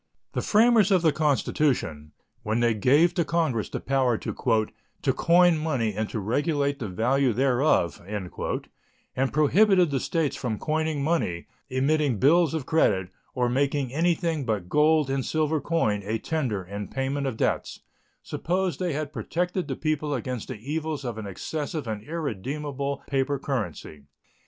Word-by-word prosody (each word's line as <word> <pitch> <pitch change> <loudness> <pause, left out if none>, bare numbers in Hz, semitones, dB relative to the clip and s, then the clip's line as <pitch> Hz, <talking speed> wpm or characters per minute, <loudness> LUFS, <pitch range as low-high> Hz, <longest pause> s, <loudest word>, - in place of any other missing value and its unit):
The - - -1
framers 220 -2 +4
of 185 -4 +3
the 160 - +5
Constitution, 140 - 0 0.3
when 110 +2 -1
they 120 -1 +3
gave 140 - +4
to 175 - +1
Congress 155 -9 0
the - - -4
power 130 -3 +1
"to - - -5
coin 165 +9 +2
money 130 -9 -1
and 110 +1 -2
to 110 - -3
regulate 140 - 0
the 115 - -3
value 125 +6 +1
thereof" 125 - +2
and 100 -3 -5 1.0
prohibited 180 +4 +4
the 135 - +1
States 160 +1 -1
from 115 -4 -3
coining 155 0 -1
money, 140 - 0 0.2
emitting 140 -1 +1
bills 160 - +4
of 150 -5 -3
credit, 100 - +2 0.3
or 125 -1 +1
making 135 0 0
anything 165 -1 +1
but 105 -7 -2
gold 150 +3 +4
and 135 -1 0
silver 155 +1 0
coin 120 -10 0
a 110 +3 -1
tender 120 -8 -2
in 100 +3 -6
payment 135 +1 -2
of 120 -4 -3
debts, - - -1 0.4
supposed 185 +1 -2
they 180 -4 -1
had 150 0 -4
protected 175 - -2
the 135 - -3
people 155 -1 -1
against 125 -2 -4
the - - -5
evils 150 +4 -4
of 115 -3 -4
an 105 - -6
excessive 150 - -4
and 110 -2 -3
irredeemable 140 - -4
paper 140 +1 0
currency. 90 - -4
140 Hz, 150 wpm, -26 LUFS, 115-160 Hz, 1.0 s, the